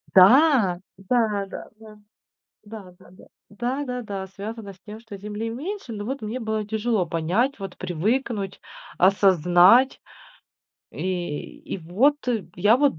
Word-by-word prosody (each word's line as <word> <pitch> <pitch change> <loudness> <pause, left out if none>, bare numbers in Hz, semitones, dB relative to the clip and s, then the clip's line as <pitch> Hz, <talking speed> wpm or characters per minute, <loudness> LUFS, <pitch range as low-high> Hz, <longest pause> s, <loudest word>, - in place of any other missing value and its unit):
Да, 215 - +6 0.2
да-да-да, 215 0 -3 0.7
да-да-да, 195 -5 -12 0.4
да-да-да, 245 -4 -4
связано 205 +1 -7
с 190 - -22
тем, 215 +1 -9
что 225 -3 -10
земли 210 +3 -5
меньше, 300 - -6
но 205 -1 -5
вот 265 0 -4
мне 220 +4 -4
было 220 -1 -2
тяжело 215 -3 0
понять, 180 - 0
вот 195 -2 -7
привыкнуть, 200 +3 -2 0.4
осознать. 185 - +5 0.9
И 175 -5 -4 0.2
и - - -4
вот 215 - +2 0.4
я 205 +6 +5
вот 280 - +2
210 Hz, 110 wpm, -24 LUFS, 190-240 Hz, 0.9 s, Да